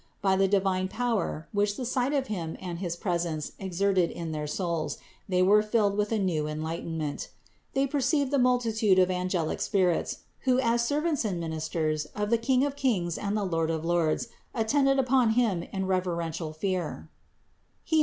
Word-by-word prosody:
By 195 Hz, -2 st, +2 dB
the 195 Hz, 0 st, +3 dB
divine 190 Hz, -1 st, +1 dB
power, 220 Hz, -8 st, -2 dB
which 205 Hz, 0 st, +1 dB
the 255 Hz, -, -3 dB
sight 250 Hz, +2 st, 0 dB
of 280 Hz, -2 st, +1 dB
Him 170 Hz, -9 st, -4 dB
and 175 Hz, -2 st, -5 dB
his 175 Hz, -3 st, -2 dB
presence 170 Hz, -4 st, -2 dB
exerted 190 Hz, -1 st, +1 dB
in 165 Hz, -2 st, -5 dB
their 150 Hz, -1 st, -3 dB
souls, 170 Hz, 0 st, -2 dB, 0.3 s
they 180 Hz, -1 st, +3 dB
were 205 Hz, +3 st, +6 dB
filled 210 Hz, -2 st, +1 dB
with 210 Hz, +1 st, 0 dB
new 185 Hz, -8 st, +1 dB
enlight 155 Hz, +2 st, -3 dB
enment. 160 Hz, -3 st, -4 dB, 0.5 s
They 270 Hz, 0 st, +3 dB
perceived 280 Hz, 0 st, +1 dB
the 280 Hz, -, +3 dB
multitude 230 Hz, -5 st, +3 dB
of 185 Hz, 0 st, +4 dB
angelic 180 Hz, -3 st, -1 dB
spirits, 185 Hz, -5 st, +1 dB, 0.2 s
who 255 Hz, -1 st, +2 dB
as 235 Hz, -1 st, +2 dB
servants 295 Hz, +3 st, 0 dB
and 195 Hz, -5 st, -1 dB
ministers 160 Hz, -1 st, -2 dB
of 210 Hz, +1 st, -2 dB
the 235 Hz, -, +4 dB
King 260 Hz, +3 st, +2 dB
of 285 Hz, -1 st, -3 dB
kings 195 Hz, -, 0 dB
and 205 Hz, 0 st, -2 dB
Lord 165 Hz, -6 st, 0 dB
of 160 Hz, 0 st, -2 dB
lords 170 Hz, +5 st, +1 dB, 0.3 s
attended 270 Hz, +4 st, +3 dB
upon 255 Hz, -3 st, +3 dB
Him 220 Hz, -7 st, +2 dB
in 190 Hz, -1 st, -2 dB
reverential 170 Hz, -4 st, -1 dB
fear 175 Hz, +1 st, -3 dB, 0.8 s
(Heb. 320 Hz, -1 st, +3 dB
190 Hz, 170 wpm, -28 LUFS, 170-235 Hz, 0.8 s, were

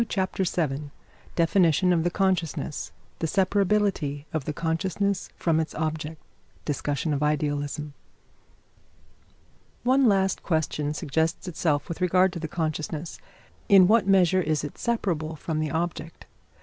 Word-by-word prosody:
] 230 Hz, -, -1 dB
CHAPTER 190 Hz, -1 st, -1 dB
VII 150 Hz, -4 st, -1 dB, 0.5 s
DEFINITION 175 Hz, +1 st, +3 dB
OF 165 Hz, -2 st, +2 dB
THE 175 Hz, -, +2 dB
CONSCIOUSNESS 175 Hz, -5 st, -1 dB, 0.3 s
THE 165 Hz, -, 0 dB
SEPARABILITY 195 Hz, -6 st, +1 dB
OF 155 Hz, -4 st, -2 dB
THE 150 Hz, -, -2 dB
CONSCIOUSNESS 185 Hz, +5 st, -1 dB
FROM 165 Hz, -2 st, +1 dB
ITS 160 Hz, -, -3 dB
OBJECT 155 Hz, 0 st, -3 dB, 0.5 s
DISCUSSION 145 Hz, +1 st, -1 dB
OF 140 Hz, -, -1 dB
IDEALISM 150 Hz, 0 st, -1 dB, 1.9 s
One 260 Hz, +2 st, +4 dB
last 195 Hz, -2 st, +2 dB
question 150 Hz, -3 st, -1 dB
suggests 160 Hz, +3 st, -1 dB
itself 155 Hz, -4 st, 0 dB
with 170 Hz, +1 st, -6 dB
regard 180 Hz, +1 st, +3 dB
to 170 Hz, -, -5 dB
the 160 Hz, -, -4 dB
consciousness. 155 Hz, 0 st, -3 dB, 0.5 s
In 195 Hz, -3 st, +8 dB
what 215 Hz, -1 st, +4 dB
measure 185 Hz, -1 st, +4 dB
is 155 Hz, -4 st, 0 dB
it 145 Hz, -, -7 dB
separable 170 Hz, -9 st, -1 dB
from 155 Hz, +1 st, -3 dB
the 155 Hz, -1 st, -1 dB
object? 165 Hz, +1 st, -4 dB
165 Hz, 135 wpm, -26 LUFS, 150-190 Hz, 1.9 s, In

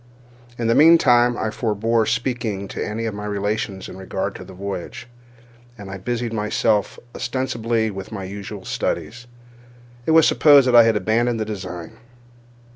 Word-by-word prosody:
In 115 Hz, -, -3 dB
the 115 Hz, -, +3 dB
meantime 120 Hz, -6 st, +5 dB
I 110 Hz, -, -2 dB
forbore 110 Hz, 0 st, 0 dB
speaking 115 Hz, -5 st, -2 dB
to -, -, -4 dB
any 110 Hz, +2 st, -4 dB
of 110 Hz, -, -3 dB
my 105 Hz, 0 st, -6 dB
relations 100 Hz, -1 st, -3 dB
in -, -, -10 dB
regard 95 Hz, 0 st, -4 dB
to -, -, -9 dB
the -, -, -13 dB
voyage, 100 Hz, +3 st, -6 dB, 0.7 s
and, 100 Hz, -2 st, -9 dB
as -, -, -6 dB
I -, -, -5 dB
busied 120 Hz, +3 st, -3 dB
myself 105 Hz, -1 st, 0 dB, 0.2 s
ostensibly 115 Hz, -3 st, -1 dB
with 95 Hz, +1 st, -8 dB
my 100 Hz, -3 st, -5 dB
usual 100 Hz, +1 st, -8 dB
studies, 120 Hz, +1 st, -3 dB, 0.8 s
it -, -, +3 dB
was 160 Hz, -, +6 dB
supposed 145 Hz, -3 st, +6 dB
that 125 Hz, -, +3 dB
I 120 Hz, -1 st, +9 dB
had 115 Hz, -1 st, +3 dB
abandoned 115 Hz, +4 st, +1 dB
the 110 Hz, -, -1 dB
design. 90 Hz, -5 st, -7 dB
110 Hz, 165 wpm, -21 LUFS, 100-120 Hz, 0.8 s, I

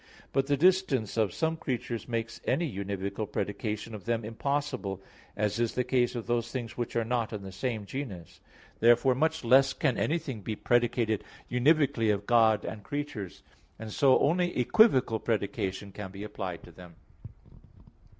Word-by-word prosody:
But 135 Hz, 0 st, +1 dB
the 145 Hz, -1 st, +2 dB
distance 175 Hz, -, +2 dB
of 110 Hz, -4 st, +2 dB
some 160 Hz, -, -1 dB
creatures 125 Hz, -5 st, -4 dB
makes 115 Hz, -1 st, -3 dB
any 170 Hz, -, +1 dB
univocal 100 Hz, +1 st, -4 dB
predication 105 Hz, +2 st, -3 dB
of 105 Hz, -, -8 dB
them 115 Hz, -2 st, -1 dB
impossible, 130 Hz, -4 st, -2 dB, 0.4 s
as 105 Hz, +1 st, 0 dB
in 120 Hz, -, +3 dB
the 125 Hz, -, +1 dB
case 125 Hz, -1 st, +1 dB
of 120 Hz, -, -4 dB
those 120 Hz, 0 st, 0 dB
things 120 Hz, -4 st, -5 dB
which 120 Hz, -1 st, -4 dB
are 115 Hz, -1 st, +1 dB
not 115 Hz, -1 st, -1 dB
in 105 Hz, -2 st, -5 dB
the 95 Hz, -, -7 dB
same 110 Hz, +1 st, -3 dB
genus. 100 Hz, -, -7 dB, 0.4 s
Therefore 120 Hz, +3 st, +5 dB
much 160 Hz, +3 st, 0 dB
less 135 Hz, +3 st, +5 dB
can 135 Hz, -6 st, 0 dB
anything 145 Hz, -8 st, -1 dB
be 110 Hz, +2 st, -4 dB
predicated 120 Hz, -2 st, +1 dB, 0.3 s
univocally 130 Hz, -3 st, +3 dB
of 100 Hz, 0 st, -2 dB
God 115 Hz, -2 st, +4 dB
and 110 Hz, -, -5 dB
creatures; 130 Hz, -, -5 dB, 0.3 s
and 110 Hz, -1 st, -7 dB
so 135 Hz, -2 st, +5 dB
only 175 Hz, +3 st, +1 dB
equivocal 125 Hz, -, +4 dB
predication 100 Hz, -3 st, -2 dB
can 95 Hz, 0 st, -7 dB
be 100 Hz, +2 st, -8 dB
applied 95 Hz, -4 st, -5 dB
to -, -, -13 dB
them. 90 Hz, 0 st, -14 dB
115 Hz, 160 wpm, -29 LUFS, 105-135 Hz, 0.4 s, Therefore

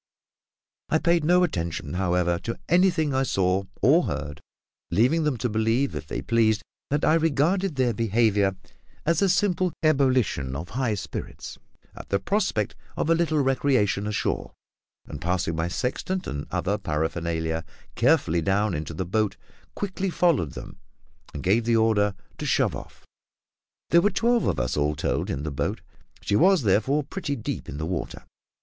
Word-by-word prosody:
I 160 Hz, -, +3 dB
paid 170 Hz, 0 st, +2 dB
no 180 Hz, +3 st, +4 dB
attention, 85 Hz, -, -2 dB
however, 90 Hz, -1 st, +1 dB
to 115 Hz, +4 st, -5 dB
anything 170 Hz, -4 st, +3 dB
I 130 Hz, -, +2 dB
saw 95 Hz, -6 st, +1 dB, 0.2 s
or 155 Hz, +10 st, +5 dB
heard, 75 Hz, 0 st, -4 dB, 0.5 s
leaving 125 Hz, -, +2 dB
them 145 Hz, -5 st, 0 dB
to 125 Hz, -, -1 dB
believe, 115 Hz, +5 st, +1 dB
if 75 Hz, -1 st, -6 dB
they -, -, -4 dB
pleased, 110 Hz, -2 st, +2 dB, 0.3 s
that 145 Hz, +1 st, +1 dB
I -, -, +4 dB
regarded 165 Hz, +3 st, +1 dB
their 130 Hz, -3 st, +1 dB
behaviour 105 Hz, -3 st, +2 dB, 0.5 s
as 165 Hz, 0 st, +2 dB
a 195 Hz, -, +3 dB
simple 180 Hz, -1 st, +2 dB
ebullition 130 Hz, -, +2 dB
of 80 Hz, +5 st, -6 dB
high 125 Hz, -3 st, -1 dB
spirits 100 Hz, -, -7 dB, 0.4 s
at -, -, -10 dB
the 100 Hz, -, +2 dB
prospect 145 Hz, -, -1 dB, 0.2 s
of 165 Hz, -, +1 dB
a -, -, +7 dB
little 160 Hz, -3 st, +1 dB
recreation 130 Hz, -6 st, +1 dB
ashore; 105 Hz, -, -2 dB, 0.5 s
and 75 Hz, -1 st, -8 dB
passing 85 Hz, -1 st, -1 dB
my 80 Hz, +1 st, -1 dB
sextant 135 Hz, -, -2 dB
and 70 Hz, 0 st, -5 dB
other 100 Hz, +2 st, -1 dB
paraphernalia 80 Hz, -1 st, -2 dB, 0.3 s
carefully 120 Hz, -, +2 dB
down 100 Hz, +4 st, +1 dB
into 80 Hz, 0 st, -4 dB
the 90 Hz, -, -3 dB
boat, 105 Hz, +3 st, 0 dB, 0.4 s
quickly 195 Hz, -1 st, -2 dB
followed 165 Hz, -, +1 dB
them -, -, -9 dB, 0.5 s
and 75 Hz, -, -7 dB
gave 100 Hz, +6 st, +3 dB
the 115 Hz, 0 st, +3 dB
order 105 Hz, -3 st, +2 dB, 0.2 s
to -, -, -3 dB
shove -, -, +2 dB
off. -, -, -11 dB, 0.9 s
There 170 Hz, -, +6 dB
were 205 Hz, -, +3 dB
twelve 235 Hz, +4 st, +1 dB
of -, -, 0 dB
us, 65 Hz, -1 st, -1 dB
all 75 Hz, +1 st, +1 dB
told, -, -, -1 dB
in 70 Hz, -, -3 dB
the 75 Hz, -, -3 dB
boat; 70 Hz, -, -2 dB, 0.4 s
she 100 Hz, -, 0 dB
was 185 Hz, -, +4 dB
therefore 125 Hz, +9 st, +2 dB
pretty 145 Hz, -2 st, -4 dB
deep 115 Hz, -, -5 dB
in 70 Hz, -, -6 dB
the 80 Hz, -, -3 dB
water. 90 Hz, +2 st, -4 dB
110 Hz, 165 wpm, -25 LUFS, -, 0.9 s, a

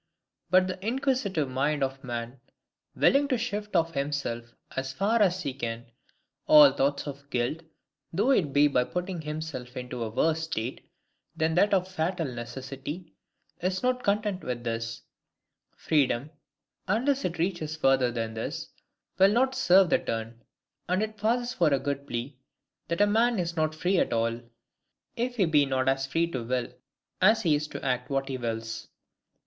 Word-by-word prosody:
But 185 Hz, 0 st, +5 dB
the 185 Hz, 0 st, -5 dB
inquisitive 230 Hz, -, 0 dB
mind 140 Hz, +3 st, 0 dB
of 135 Hz, 0 st, -3 dB
man, 120 Hz, 0 st, -5 dB, 0.6 s
willing 280 Hz, +1 st, +4 dB
to 260 Hz, -3 st, +1 dB
shift 210 Hz, -3 st, -4 dB
off 165 Hz, -1 st, +2 dB
from 140 Hz, -, -1 dB
himself, 120 Hz, -5 st, -4 dB, 0.2 s
as 130 Hz, 0 st, -3 dB
far 215 Hz, +8 st, +1 dB
as 185 Hz, -2 st, +2 dB
he 140 Hz, -3 st, -2 dB
can, 115 Hz, -2 st, -5 dB, 0.6 s
all 300 Hz, -2 st, +9 dB
thoughts 140 Hz, +1 st, 0 dB
of 140 Hz, -1 st, -8 dB
guilt, 125 Hz, +5 st, -1 dB, 0.5 s
though 205 Hz, +10 st, +2 dB
it 175 Hz, -, +2 dB
be 145 Hz, +1 st, +5 dB
by 125 Hz, -3 st, +2 dB
putting 180 Hz, +5 st, -4 dB
himself 150 Hz, -5 st, -6 dB
into 125 Hz, -1 st, -5 dB
a 110 Hz, -, -3 dB
worse 160 Hz, +7 st, +1 dB
state 120 Hz, -5 st, -4 dB, 0.5 s
than 160 Hz, 0 st, +1 dB
that 200 Hz, +5 st, +4 dB
of 185 Hz, -2 st, +2 dB
fatal 175 Hz, -1 st, -1 dB
necessity, 135 Hz, +6 st, -7 dB, 0.5 s
is 185 Hz, +3 st, -1 dB
not 250 Hz, 0 st, +1 dB
content 205 Hz, -2 st, 0 dB
with 120 Hz, -1 st, -4 dB
this: 115 Hz, 0 st, -3 dB, 0.7 s
freedom, 140 Hz, -2 st, +1 dB, 0.6 s
unless 260 Hz, +8 st, +1 dB
it 175 Hz, -1 st, -2 dB
reaches 160 Hz, -3 st, -2 dB
further 135 Hz, -4 st, +3 dB
than 115 Hz, -1 st, -3 dB
this, 110 Hz, -, -5 dB, 0.5 s
will 195 Hz, +1 st, +7 dB
not 260 Hz, +4 st, +2 dB
serve 185 Hz, -5 st, +5 dB
the -, -, +4 dB
turn: 115 Hz, +1 st, -4 dB, 0.5 s
and 185 Hz, +3 st, +2 dB
it 215 Hz, 0 st, -4 dB
passes 240 Hz, +4 st, 0 dB
for 170 Hz, -9 st, +2 dB
a 140 Hz, -, +4 dB
good 140 Hz, 0 st, -3 dB
plea, 120 Hz, +4 st, -4 dB, 0.5 s
that 170 Hz, +4 st, -1 dB
a -, -, +7 dB
man 225 Hz, +3 st, +3 dB
is 170 Hz, -2 st, -2 dB
not 155 Hz, -1 st, 0 dB
free 180 Hz, +4 st, +1 dB
at -, -, +1 dB
all, 115 Hz, +1 st, 0 dB, 0.7 s
if 245 Hz, +1 st, -2 dB
he 200 Hz, -6 st, +3 dB
be 150 Hz, -3 st, +4 dB
not 130 Hz, -1 st, 0 dB
as 135 Hz, 0 st, +1 dB
FREE 165 Hz, +4 st, 0 dB
TO 130 Hz, -5 st, -3 dB
WILL 125 Hz, 0 st, -1 dB, 0.5 s
as 215 Hz, +4 st, +5 dB
he 165 Hz, -4 st, +3 dB
is 150 Hz, +1 st, 0 dB
to 150 Hz, -, -7 dB
ACT 125 Hz, -1 st, -1 dB
WHAT 135 Hz, 0 st, -1 dB
HE 130 Hz, -1 st, -3 dB
WILLS. 115 Hz, -1 st, -4 dB
155 Hz, 170 wpm, -28 LUFS, 130-190 Hz, 0.7 s, all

